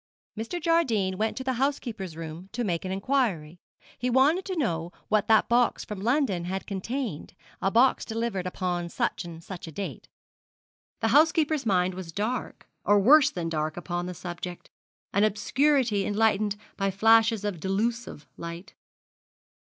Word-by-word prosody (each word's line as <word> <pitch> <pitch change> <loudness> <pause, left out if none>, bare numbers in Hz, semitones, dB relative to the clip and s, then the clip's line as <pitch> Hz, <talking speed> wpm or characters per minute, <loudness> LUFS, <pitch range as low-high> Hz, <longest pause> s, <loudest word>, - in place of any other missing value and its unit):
Mr. 225 +11 -4
Jardine 265 - +1
went 220 0 0
to 260 - -3
the 260 0 0
housekeeper's 220 - -2
room 165 +3 -7
to 245 - -2
make 175 -4 -2
an 185 - -3
inquiry. 190 - -1 0.4
He 250 - 0
wanted 285 +9 +3
to 380 - -3
know 170 - -1 0.2
what 215 -1 +2
that 220 -1 +5
box 240 0 +2
from 210 -2 -6
London 225 - +1
had 190 +2 -3
contained, 205 - -4 0.3
a 195 - +2
box 245 +5 +4
delivered 225 -5 -2
upon 180 -2 -2
such - - -2
and 165 -1 -9
such 180 -1 -8
a - - -7
date. 195 +6 -6 0.9
The 225 - +2
housekeeper's 305 0 +3
mind 185 -2 +2
was 180 -2 -7
dark, 215 +8 -3 0.2
or 205 0 +4
worse 280 +8 +7
than 175 -2 -4
dark 155 -1 -2
upon 175 0 -3
the 180 - -6
subject 175 +1 -7 0.4
an 200 - +3
obscurity 230 +1 +2
enlightened 210 -1 +1 0.2
by 195 -1 +1
flashes 225 +2 +4
of 200 -5 -2
delusive 210 -2 -2
light. 170 +4 -8
205 Hz, 155 wpm, -27 LUFS, 180-240 Hz, 0.9 s, worse